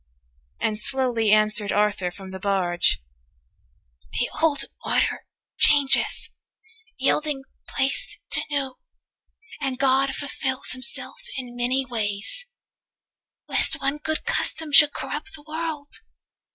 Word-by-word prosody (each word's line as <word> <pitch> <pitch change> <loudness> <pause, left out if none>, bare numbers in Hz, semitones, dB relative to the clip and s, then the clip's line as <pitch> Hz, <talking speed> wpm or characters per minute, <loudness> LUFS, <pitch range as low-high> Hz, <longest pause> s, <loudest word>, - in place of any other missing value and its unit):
And 215 -1 -1
slowly 245 -3 +1
answered 215 0 +3
Arthur 205 -3 +1
from 190 +1 -10
the 190 - -7
barge: 185 - +2 1.1
'The 245 - 0
old 315 -3 +4 0.2
order - - +1 0.3
changeth, 285 -2 +4 0.7
yielding 300 -3 +1 0.2
place 270 +1 0
to - - +4
new, 275 -3 -2 0.8
240 275 - 0
And 260 -1 -2
God 270 0 +2
fulfils 265 -2 -3
Himself 255 +1 -5 0.2
in 250 -2 -6
many 255 +2 0
ways, 225 - -2 1.0
Lest - - +2
one 275 +2 0
good 315 +1 -3
custom 320 -2 -1
should 290 +1 +8
corrupt 350 +9 -5
the 295 - -14
world. 315 -2 -4
265 Hz, 110 wpm, -24 LUFS, 215-290 Hz, 1.1 s, should